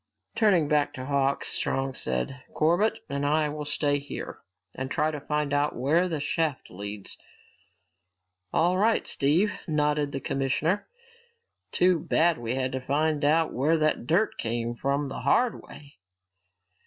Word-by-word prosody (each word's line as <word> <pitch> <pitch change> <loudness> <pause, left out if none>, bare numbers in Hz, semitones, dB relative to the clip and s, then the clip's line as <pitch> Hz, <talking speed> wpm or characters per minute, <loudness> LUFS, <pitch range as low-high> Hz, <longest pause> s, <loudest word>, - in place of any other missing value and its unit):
Turning 190 -9 +3
back 150 -1 +1
to 130 - -6
Hawks, 140 0 0
Strong 135 0 -1
said, 65 - -2
"Corbett 175 +8 +2
and 140 0 -3
I 150 +1 +2
will 150 0 -5
stay 145 -1 0
here 145 - -7 0.4
and 130 0 -4
try 155 +3 +1
to 150 - -5
find 150 -1 -1
out 145 +1 +1
where 160 +9 +2
that 160 -4 -2
shaft 150 -1 -2
leads." 100 +1 -7 1.3
"All 180 +3 +2
right, 220 +2 +2
Steve," 165 +10 +2
nodded 150 -2 +1
the 135 - -3
commissioner. 140 +9 -1 0.8
"Too 180 -1 +3
bad 165 +1 +2
we 120 +1 -2
had 130 -1 -1
to 130 - -3
find 150 +3 0
out 160 +2 +3
where 150 +6 +2
that 155 -5 0
dirt 185 +9 +1
came 115 +1 -2
from 140 +4 -1
the 135 - -6
hard 245 -2 +2
way." 145 0 -14
145 Hz, 150 wpm, -27 LUFS, 135-160 Hz, 1.3 s, Turning